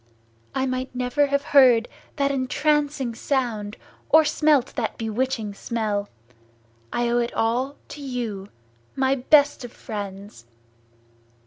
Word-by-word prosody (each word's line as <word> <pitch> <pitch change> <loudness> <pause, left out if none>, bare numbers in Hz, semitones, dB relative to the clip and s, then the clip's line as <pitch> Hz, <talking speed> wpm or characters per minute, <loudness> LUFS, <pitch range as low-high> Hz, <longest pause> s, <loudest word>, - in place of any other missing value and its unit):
I 265 0 +1
might 255 0 -3
never 250 +4 +1
have 280 0 0
heard 250 -5 +6 0.3
that 280 -1 +1
entrancing 285 -1 0
sound, 225 -5 -2 0.3
or 315 0 +6
smelt 300 -3 +2
that 235 -5 -3
bewitching 225 -1 -2
smell! 210 -1 -2 0.8
I 240 0 0
owe 240 +1 +2
it 235 0 -2
all 245 +5 0
to 295 - -9
you, 235 -7 -4 0.5
my 265 0 +2
best 285 +2 +3
of 245 - -8
friends!" 200 - -8
250 Hz, 120 wpm, -24 LUFS, 225-280 Hz, 0.8 s, heard